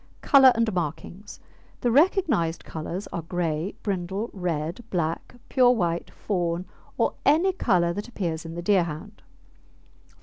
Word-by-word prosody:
COLOUR 270 -3 +7
AND 230 -2 +1
MARKINGS 175 +4 -5 0.4
The 240 - +2
recognised 275 - +2
colours 170 +5 -5
are 170 - -2
grey, 165 +1 -2
brindle, 195 +2 -3
red, 175 +1 -3
black, 165 +5 -2
pure 255 -2 +4
white, 175 -8 0
fawn, 175 -3 -2 0.3
or - - +1
any 345 +6 +4
colour 180 - +2
that 205 +5 -5
appears 170 -9 -3
in 165 0 -8
the 175 - -5
Deerhound. 175 0 0
180 Hz, 130 wpm, -25 LUFS, 170-230 Hz, 0.4 s, COLOUR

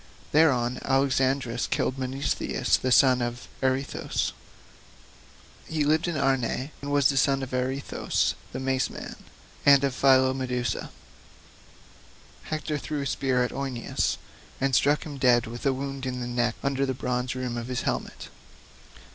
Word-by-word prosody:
Thereon 125 -6 +3
Alexandrus 135 -2 +1
killed 130 - -1
Menesthius 130 +1 0
the 130 - -2
son 130 -1 +5
of 120 0 -4
Areithous; 130 +1 -1 1.4
he 155 -2 0
lived 155 +3 +2
in 170 -3 -1
Arne, 135 0 0
and 140 0 -4
was 145 -1 +2
son 135 +1 +2
of 130 - -6
Areithous 130 +2 -1 0.2
the - - -5
Mace 130 0 0
man, - - -8 0.5
and 140 -1 +7
of 135 -2 +1
Phylomedusa. 130 -2 +2 1.6
Hector 155 -1 -3
threw 150 0 -3
a - - -3
spear 130 -1 +1
at 125 - -2
Eioneus 135 -3 -2 0.4
and 135 0 0
struck 145 +4 +3
him 145 -3 -7
dead 120 -2 +4
with 120 +4 -4
a - - +4
wound 135 0 -4
in 125 -1 -3
the 125 - -3
neck 120 -1 0
under 140 -1 0
the 130 - -1
bronze 125 0 -2
rim 125 -2 -3
of 120 0 -4
his 125 -1 -2
helmet. - - -3
130 Hz, 145 wpm, -26 LUFS, 125-140 Hz, 1.6 s, and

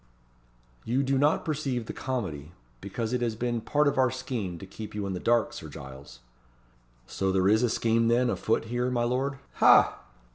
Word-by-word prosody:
"You 130 +4 0
do 135 +1 +1
not 150 +3 +2
perceive 135 -6 -2
the - - -6
comedy, 85 - -4 0.3
because 110 - -4
it 125 - 0
has 115 -2 -1
been 120 0 -2
part 150 +5 +1
of 140 - +1
our 130 -1 +4
scheme 120 -8 -4
to 95 - -9
keep 105 +2 -9
you 105 -1 -2
in 95 - -3
the 90 - -4
dark, 120 +2 +2
Sir - - -8
Giles." 65 -2 -11 0.8
"So 95 +9 -1
there 95 0 +2
is 110 +3 +4
a 125 - +2
scheme, 115 0 +1
then, 120 +2 +3
a - - 0
foot 110 - 0
here, 120 +2 -1
my 120 -2 0
lord? 130 +3 -1 0.2
ha!" - - +6
120 Hz, 195 wpm, -28 LUFS, 100-130 Hz, 0.8 s, ha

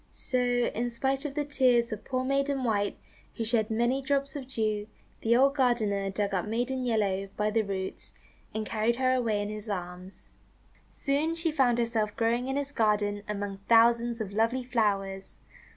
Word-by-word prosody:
So, 255 - -1
in 245 -1 0
spite 265 +4 -1
of 280 -2 -4
the 295 -1 -1
tears 250 -5 +3
of 215 0 -5
poor 255 +2 -2
Maiden 275 0 0
White, 205 -4 0 0.4
who 230 - -2
shed 220 -1 +1
many 240 +4 +1
drops 275 +1 -1
of 270 -3 -6
dew, 215 -4 -1 0.3
the 230 +1 +3
old 275 +2 +5
gardener 220 -7 +1
dug 200 +1 -2
up 185 +1 -1
Maiden 245 +4 -1
Yellow 200 -5 0
by 210 0 +1
the 225 +1 +2
roots, 195 -2 -5 0.4
and 220 0 -3
carried 225 +2 0
her 255 +1 +2
away 225 -5 +1
in 205 - -4
his 215 +1 -7
arms. 180 0 -7 0.6
Soon 300 +4 -1
she 330 -1 0
found 260 -6 +3
herself 230 -3 0
growing 235 +2 +1
in 270 - -1
his 285 0 -2
garden 210 -4 +1
among 205 -1 -4
thousands 235 0 +4
of 205 -3 -4
lovely 230 +4 +1
flowers. 200 -5 -1
230 Hz, 175 wpm, -28 LUFS, 210-255 Hz, 0.6 s, old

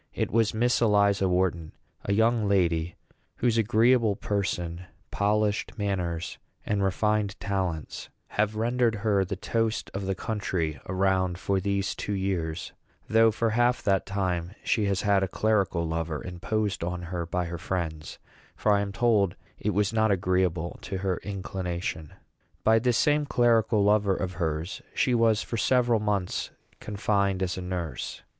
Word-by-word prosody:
It - - -1
was 115 -1 +3
Miss 120 +3 +1
Eliza 100 -3 +3
Wharton 90 -3 0 0.3
a - - -1
young 110 +1 +3
lady 85 -3 +1 0.4
whose 115 -1 +1
agreeable 115 0 +3
person, 90 -4 -2 0.3
polished 105 +2 0
manners, 90 -5 -2 0.3
and 105 -1 0
refined 105 +1 0
talents 95 -6 -3 0.2
have 105 +1 0
rendered 120 +1 +1
her 100 -3 +3
the 95 +1 -4
toast 115 +3 -1
of 100 0 -4
the 95 - 0
country 90 -8 -2
around 95 -1 +1
for 95 +1 0
these 100 0 -1
two 105 - -4
years; 90 -4 -2 0.3
though 115 +1 +5
for 110 +1 0
half 120 +2 +2
that 95 -2 +1
time 95 -2 -2
she 110 -3 +1
has 100 -1 0
had 100 -2 +3
a 95 - +1
clerical 95 -5 +1
lover 80 -1 -3
imposed 100 +2 -2
on 90 +1 -3
her 85 -1 -4
by 90 +1 -1
her 85 0 -5
friends; 80 -4 -4 0.4
for 105 - +1
I 100 -1 +4
am 100 -1 -3
told 105 -4 +2 0.2
it 105 - -1
was 105 0 +1
not 110 0 +3
agreeable 90 -3 0
to 95 - -4
her 95 -1 -1
inclination. 90 -5 -4 0.5
By 110 +1 +5
this 120 0 +1
same 150 0 +2
clerical 115 -4 +3
lover 100 -1 +3
of 90 -1 -3
hers 80 0 -3
she 125 - +2
was 115 -2 +3
for 115 - -4
several 120 -1 +3
months 100 -3 -1 0.3
confined 100 -2 0
as 90 -1 -1
a 95 - -5
nurse. 90 -3 -5
100 Hz, 155 wpm, -27 LUFS, 90-110 Hz, 0.5 s, though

